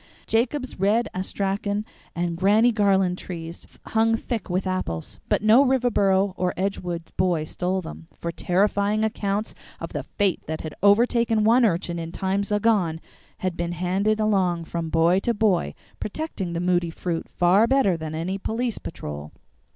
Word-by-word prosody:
Jacob's 250 +1 -1
Red 210 +5 +2
Astrakhan 200 +2 -2 0.3
and 170 0 -1
Granny 210 +7 +4
Garland 195 -4 +2
trees 165 -2 -7 0.2
hung 225 0 +2
thick 225 -3 -4
with 185 +2 -1
apples, 185 - -3
but - - +1
no 225 +6 +7
Riverboro 205 -7 +2
or 180 -1 -1
Edgewood 180 -3 -3
boy 175 -4 +1
stole 180 +4 -2
them; 160 0 -9
for 170 - -4
terrifying 200 +5 +1
accounts 210 -1 -2 0.3
of - - -7
the - - -2
fate 200 -4 -1
that 160 0 -3
had 155 - -6
overtaken 225 +2 +4
one 235 +4 +5
urchin 170 -3 0
in 165 0 -5
times 195 +3 -1
agone 205 -6 +2 0.5
had 185 -2 -1
been 170 0 -2
handed 190 +5 0
along 185 -6 +1
from 165 -1 -4
boy 165 +3 +3
to 235 +3 -1
boy, 205 -4 +1 0.2
protecting 210 - -4
the 170 - -2
Moody 175 -1 +1
fruit 165 0 -4
far 185 +6 +4
better 265 -9 +3
than 160 -1 -5
any 185 +5 -3
police 230 +3 -2
patrol. 75 - -7
190 Hz, 155 wpm, -24 LUFS, 175-215 Hz, 0.5 s, no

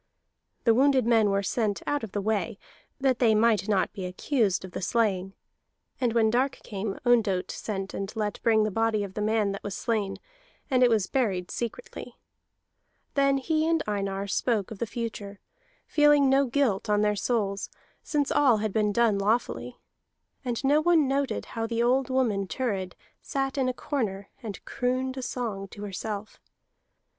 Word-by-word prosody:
The 230 - +5
wounded 265 0 +4
men 225 -3 +4
were 200 0 +1
sent 210 0 -1
out 290 -4 -1
of 220 - -5
the 205 - -2
way, 205 -3 -1 0.4
that 265 -2 +2
they 225 -3 +4
might 215 -2 +3
not 195 -3 +1
be 190 - -5
accused 195 0 0
of 185 - -10
the - - -5
slaying; 195 -3 0 0.7
and 245 -3 +1
when 225 -2 +3
dark 260 +3 +2
came 200 -1 -4
Ondott 215 -7 +2
sent 195 -3 -4
and 195 0 -4
let 210 -2 -2
bring 220 -2 +4
the 215 - 0
body 225 0 +1
of 195 -2 -7
the 210 - -3
man 215 -1 +1
that 195 - -5
was 200 -1 -5
slain, 210 -4 -1 0.5
and 255 -1 +3
it 250 - +6
was 220 -4 +2
buried 190 -9 -1
secretly. 235 - -6 1.0
Then 275 -1 +3
he 310 +3 0
and 330 -1 +2
Einar 195 -1 -2
spoke 205 +1 0
of 215 - -8
the 235 - -2
future, 210 -3 -5 0.5
feeling 295 -2 +4
no 275 0 +4
guilt 235 -6 0
on 210 0 +3
their 210 0 +2
souls, 200 -3 -1 0.3
since 290 -2 -1
all 260 -6 +4
had 215 -1 -2
been 210 -1 +2
done 220 -2 +2
lawfully. 220 +4 -1 0.7
And 245 -1 -3
no 290 +3 +4
one 325 -3 +4
noted 275 0 -1
how 225 -1 -4
the 230 0 0
old 255 +2 +2
woman 225 -7 +1
Thurid 195 -6 -2 0.3
sat 270 -1 -2
in 265 -2 +1
a - - +2
corner 205 -8 -3
and 210 -5 -7
crooned 255 +1 -1
a - - -3
song 225 -6 -4
to 205 +2 -10
herself. 205 +1 -5
225 Hz, 175 wpm, -27 LUFS, 200-255 Hz, 1.0 s, it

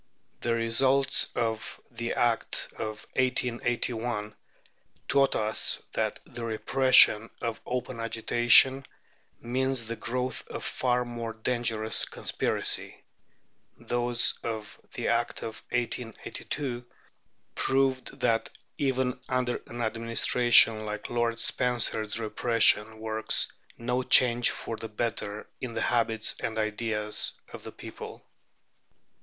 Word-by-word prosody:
The 120 -1 0
results 130 +4 +3
of 115 -2 -2
the 115 0 -3
Act 120 -1 0
of 110 -1 -6
1881 120 -3 -1 0.7
taught 140 -1 +3
us 110 0 +2
that - - -1
the 120 - -8
repression 115 -1 +4
of 115 -1 -4
open 125 -1 -3
agitation 120 +3 +4 0.6
means 130 0 0
the 115 +1 -4
growth 125 +2 -4
of - - -7
far 125 -1 0
more 120 -1 -5
dangerous 110 -1 0
conspiracy; - - -1 0.7
those 120 0 0
of 110 -2 -6
the - - -3
Act 120 0 -1
of 110 - -7
1882 125 +2 -4 0.7
proved 135 -1 0
that 115 0 +1 0.3
even 130 -2 0
under 125 -1 -1
an 120 0 -5
administration 115 0 +4
like 105 0 -6
Lord 120 -1 0
Spencer's 115 -4 +1
repression 110 -1 +2
works 110 0 0 0.3
no 125 +2 -1
change 120 -2 +5
for 115 - -5
the 110 - -6
better 105 -2 -3
in 120 -3 -6
the 115 - -1
habits 115 -2 0
and 110 -1 -4
ideas 110 -1 -1 0.2
of - - -9
the - - -8
people. - - -10
115 Hz, 110 wpm, -28 LUFS, 110-125 Hz, 0.7 s, change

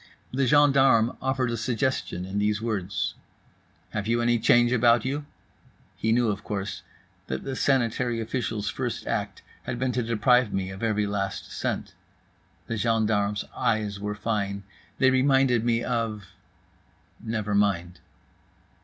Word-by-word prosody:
The 135 0 +1
gendarme 135 -4 +5
offered 130 -2 0
a 115 - -2
suggestion, 120 -5 -1
in 95 +2 -3
these 105 +1 +1
words: 100 -4 -2 0.8
"Have 105 0 -3
you 115 +1 +2
any 120 0 +2
change 120 +1 +4
about 120 -1 +4
you?" 145 +2 -3 0.7
He 110 - -1
knew, 120 0 +3
of 105 0 -3
course, 100 -1 -4 0.5
that 65 0 -4
the 135 - -4
sanitary 120 -3 +1
official's 110 -2 -3
first 120 -3 -3
act 100 -2 -3 0.2
had 120 - -3
been 130 +1 0
to 125 - 0
deprive 115 +1 +3
me 95 0 -2
of 95 - -9
every 105 -2 +1
last 100 -1 -3
cent. - - -3 0.7
The 115 - -3
gendarme's 105 -2 +1
eyes 105 -2 0
were 105 +1 -3
fine. 100 -2 -2 0.3
They 130 -1 +4
reminded 130 -2 +3
me 120 -1 +1
of… 115 -5 -2 1.0
never 110 -2 -2
mind. 90 -4 +1
115 Hz, 140 wpm, -26 LUFS, 105-125 Hz, 1.0 s, gendarme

